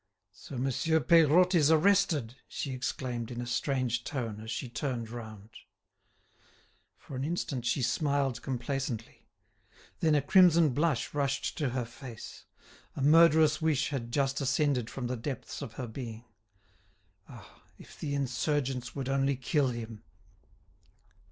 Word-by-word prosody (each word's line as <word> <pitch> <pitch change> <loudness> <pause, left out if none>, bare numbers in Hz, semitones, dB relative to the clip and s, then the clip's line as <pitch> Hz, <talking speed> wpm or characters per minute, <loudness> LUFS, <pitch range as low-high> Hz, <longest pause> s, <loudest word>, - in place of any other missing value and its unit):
"So 125 +6 -10
Monsieur 135 +5 +1
Peirotte 170 +3 +5
is 155 -4 +4
arrested!" 160 - +3
she 135 - -4
exclaimed 125 -2 -3
in 120 -1 -6
a 120 - -3
strange 120 -1 -1
tone 115 -7 -4
as 110 +1 -8
she 130 - -3
turned 120 -1 -4
round. 110 -3 -9 1.5
For 140 - -10
an 130 - -3
instant 140 -6 -2
she 130 +2 +1
smiled 135 0 0
complacently; 125 -2 -4 0.7
then 155 -2 +3
a 145 - +3
crimson 170 -1 +6
blush 140 -2 0
rushed 140 -1 -1
to 145 -4 +1
her 125 -1 -2
face. 120 -1 -10 0.5
A 135 - -3
murderous 155 0 +5
wish 155 -4 +1
had 120 -5 -4
just 135 +1 0
ascended 135 -3 +1
from 130 - -5
the 125 +1 -2
depths 125 +4 -6
of 130 -6 -6
her 125 - -5
being. 115 -1 -7 1.0
"Ah! - - -14 0.2
if - - -15
the 145 -1 -2
insurgents 135 -1 -1
would 135 -3 -4
only 135 0 +1
kill 135 +3 +1
him!" 115 -3 -5
135 Hz, 140 wpm, -30 LUFS, 120-150 Hz, 1.5 s, crimson